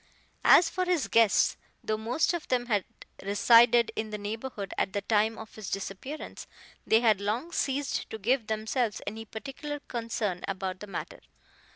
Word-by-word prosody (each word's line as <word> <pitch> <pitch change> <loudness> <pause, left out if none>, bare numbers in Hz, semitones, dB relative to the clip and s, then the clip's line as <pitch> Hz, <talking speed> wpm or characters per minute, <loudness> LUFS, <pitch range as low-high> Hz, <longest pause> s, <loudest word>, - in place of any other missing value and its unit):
As 345 - +7
for 365 +2 -1
his 355 -5 +1
guests, 225 -3 +4 0.3
though 215 - 0
most 235 +11 0
of 345 -3 -4
them 245 -1 +1
had 210 -5 0 0.4
resided 235 +4 +5
in 220 0 -3
the 210 - -4
neighborhood 210 0 -5
at 190 - -1
the 200 - -1
time 220 +1 +2
of 220 - -10
his 215 -3 -7
disappearance, 195 +10 -6 0.4
they 220 +1 +5
had 215 -4 +3
long 230 +11 -2
ceased 280 -3 -1
to 220 - -5
give 230 +2 +1
themselves 220 +1 -1
any 220 +2 -5
particular 275 +6 -6
concern 225 -7 -3
about 190 -1 -3
the 210 - -8
matter. 195 - -6
220 Hz, 165 wpm, -29 LUFS, 205-250 Hz, 0.4 s, As